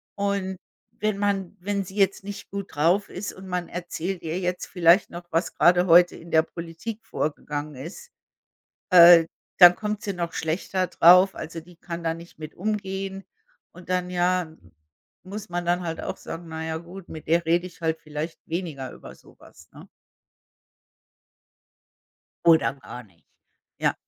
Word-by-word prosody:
Und, 200 -2 -2 0.4
wenn 210 -2 -1
man 200 -2 -1
wenn 200 +1 -2
sie 190 - -11
jetzt 195 0 +2
nicht 205 0 -8
gut 200 -2 -6
drauf 175 +7 +2
ist 195 +3 -5
und 190 0 -12
man 180 -1 -3
erzählt 175 +1 -5
ihr 165 +3 -3
jetzt 180 -1 -2
vielleicht 175 +2 +4
noch, 175 0 -8
was 165 +2 0
grade 175 +1 +5
heute 175 +1 +6
in 170 +1 -12
der 160 - +5
Politik 170 +8 -8
vorgegangen 150 0 -4
ist, 170 - -9 0.8
äh, 170 -2 +9 0.3
dann 175 -1 +10
kommt 210 -1 -4
sie 200 - -2
noch 170 -2 -4
schlechter 180 +3 -1
drauf. 180 +3 +6
Also, 165 +1 -7
die 175 +1 -18
kann 170 0 -7
da 165 -1 0
nicht 170 0 -13
mit 155 -1 -8
umgehen 195 -1 -3 0.5
und 180 +1 -15
dann 180 -1 0
ja, 180 -2 0 0.7
muss 200 +1 -8
man 175 0 -3
dann 175 +1 +1
halt 165 -1 -4
auch - - -5
sagen, 165 +1 -8
na 160 0 -5
ja 160 0 -3
gut, 175 +3 -11
mit 155 - -9
der 170 +1 +2
rede 170 +2 +2
ich 175 -1 -18
halt 160 0 -1
vielleicht 155 +2 -6
weniger 160 -7 -4
über - - -12
sowas. - - -19
Ne? - - -13 2.6
Oder 160 -4 +5
gar 125 -2 -10
nicht. 95 -7 -26 0.5
Ja. - - +2
175 Hz, 160 wpm, -25 LUFS, 165-190 Hz, 2.6 s, dann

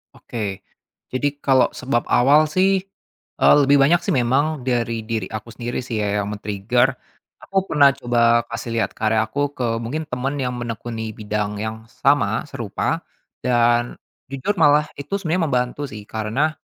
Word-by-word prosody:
Oke, 105 -5 -5 0.5
jadi 135 +3 +1
kalau 135 -3 +3
sebab 125 -2 -1
awal 150 +5 +5
sih, 190 +3 +2 0.6
eee, - - +6
lebih 140 +1 +5
banyak 150 +6 +4
sih 170 - -5
memang 135 +2 +1
dari 115 -3 -1
diri 110 -4 -3
aku 110 +2 -7
sendiri 120 +1 -4
sih 115 -4 -2
ya 105 0 0
yang 100 +1 -4
men 105 - -8
trigger. 120 +6 +1 0.5
Aku 195 0 -1
pernah 140 -2 +5
coba 120 -3 +3
kasih 115 0 -5
lihat 110 -4 0
karya 110 0 +2
aku 145 +4 -2
ke 120 -4 -1
mungkin 145 +7 -4
teman 125 +2 -2
yang 125 -1 -2
menekuni 115 -2 -5
bidang 105 -1 -3
yang 110 +1 -5 0.2
sama, 140 +1 +3
serupa 115 -7 -3 0.4
dan 120 -1 +2 0.4
jujur 135 +10 -2
malah 150 -2 +4
itu 140 +7 -7
sebenarnya 170 0 0
membantu 125 +2 -1
sih. 105 -6 -8
Karena 115 +9 -1
120 Hz, 160 wpm, -21 LUFS, 110-140 Hz, 0.6 s, eee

